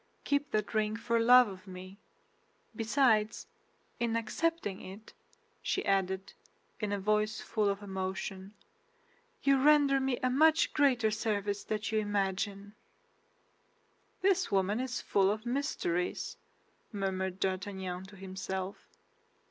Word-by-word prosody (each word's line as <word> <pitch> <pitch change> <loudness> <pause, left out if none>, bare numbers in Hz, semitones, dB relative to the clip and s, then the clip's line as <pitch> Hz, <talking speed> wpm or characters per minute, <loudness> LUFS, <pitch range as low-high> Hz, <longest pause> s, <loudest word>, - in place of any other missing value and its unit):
Keep 285 0 0
that 215 -2 -1
ring 215 0 +1
for 235 0 0
love 250 +1 +7
of 190 0 -10
me. 185 +2 -10 0.8
Besides, 225 -2 +2 0.5
in 235 -1 0
accepting 230 - -1
it," 195 +4 -11 0.5
she 390 - -1
added, 190 0 0 0.5
in 210 -2 -2
a 205 - 0
voice 215 +2 +1
full 215 -2 0
of 200 +1 -3
emotion, 190 +1 -5 0.9
"you 275 -1 +4
render 285 -1 +5
me 265 -2 0
a 255 - +3
much 315 +4 +4
greater 250 -7 +3
service 205 -2 -1
than 215 -1 -2
you 220 - +2
imagine." 200 0 -2 1.5
"This 385 -1 +2
woman 200 +3 +1
is 255 -1 -3
full 195 -1 +2
of 215 +3 -2
mysteries," 240 -9 -2 0.6
murmured 190 -2 -2
D'Artagnan 190 -1 -3
to 200 +1 -13
himself. 190 0 -5
210 Hz, 120 wpm, -31 LUFS, 190-245 Hz, 1.5 s, love